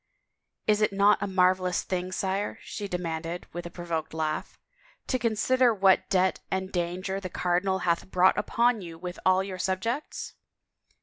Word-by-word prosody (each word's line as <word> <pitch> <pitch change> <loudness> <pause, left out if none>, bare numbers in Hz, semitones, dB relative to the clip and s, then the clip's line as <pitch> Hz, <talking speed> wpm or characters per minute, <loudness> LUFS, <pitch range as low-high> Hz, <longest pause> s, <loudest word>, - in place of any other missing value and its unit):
" - - -56
Is 215 0 +3
it 215 - +3
not 200 +1 +4
a 200 - -1
marvelous 185 -1 +2
thing, 185 0 -3
sire," 195 +2 -2
she 205 - -5
demanded 170 -1 -4
with 175 0 -5
a - - -8
provoked 170 -2 -4
laugh, 155 -1 -2 0.5
"to 255 - 0
consider 240 +1 +3
what 190 -1 +4
debt 185 -1 +2
and 190 0 -2
danger 185 +2 -2
the 185 -2 -6
cardinal 180 +2 0
hath 170 +1 0
brought 185 0 +4
upon 235 +2 +2
you 165 -2 -8
with 180 +1 -7
all 185 0 +4
your 190 -1 -6
sub 190 0 0
jects?" 240 +8 -3
185 Hz, 170 wpm, -27 LUFS, 175-200 Hz, 0.5 s, not